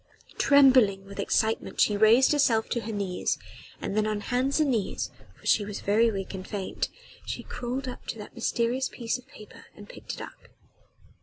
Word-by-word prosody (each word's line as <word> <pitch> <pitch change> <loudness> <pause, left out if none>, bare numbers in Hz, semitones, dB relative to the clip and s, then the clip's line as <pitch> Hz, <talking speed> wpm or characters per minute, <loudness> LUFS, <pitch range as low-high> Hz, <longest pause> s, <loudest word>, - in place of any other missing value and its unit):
Trembling 255 -9 +5
with 200 0 -10
excitement 220 +2 0
she 210 - +4
raised 220 +5 +5
herself 235 -7 +3
to 240 - 0
her 225 +1 -5
knees 200 -4 -1 0.4
and - - -4
then 215 0 +2
on 210 -1 -2
hands 255 +6 0
and 300 -3 +3
knees 220 -5 -2 0.2
for - - -21
she 210 - +4
was 205 0 -6
very 220 +3 +3
weak 195 -3 -4
and 185 -1 -7
faint 200 -3 -3 0.3
she - - -5
crawled 250 +2 -4
up 250 - -8
to - - -4
that 210 - -10
mysterious 245 +3 0
piece 235 0 -3
of 250 - -18
paper 235 -7 -14
and - - -13
picked - - -7
it - - -9
up. - - -11
225 Hz, 185 wpm, -27 LUFS, 205-255 Hz, 0.4 s, Trembling